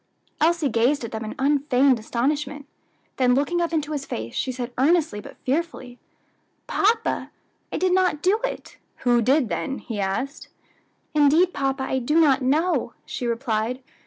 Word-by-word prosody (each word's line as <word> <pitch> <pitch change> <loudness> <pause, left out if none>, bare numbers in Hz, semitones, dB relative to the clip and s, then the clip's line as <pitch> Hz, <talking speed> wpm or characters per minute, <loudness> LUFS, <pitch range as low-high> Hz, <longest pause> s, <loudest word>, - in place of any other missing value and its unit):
Elsie 330 -1 +3
gazed 250 +3 +1
at 230 - -5
them 220 0 -4
in 215 - -6
unfeigned 275 -2 +3
astonishment; 285 +6 -2 0.5
then 250 -1 +3
looking 320 +6 +1
up 340 - -1
into 310 -2 -1
his 290 -2 -2
face, 115 - -5
she 260 - -1
said 245 -1 -5
earnestly 300 -4 +2
but - - -12
fearfully, 265 -4 -2 0.7
"Papa, 450 +3 +1 0.4
I - - -2
did 370 -1 +2
not 365 -5 +2
do 395 +4 +3
it." - - -5 0.3
"Who 240 -1 +4
did, 260 +3 +3
then?" 170 +9 -3
he 225 -4 -6
asked. 200 +9 -3 0.7
"Indeed, 305 +5 +4
papa, 270 -1 -1
I 265 0 -1
do 300 +6 +2
not 280 -4 +4
know," 310 +8 +1
she 245 - -4
replied. 235 +1 -1
275 Hz, 160 wpm, -24 LUFS, 245-310 Hz, 0.7 s, Who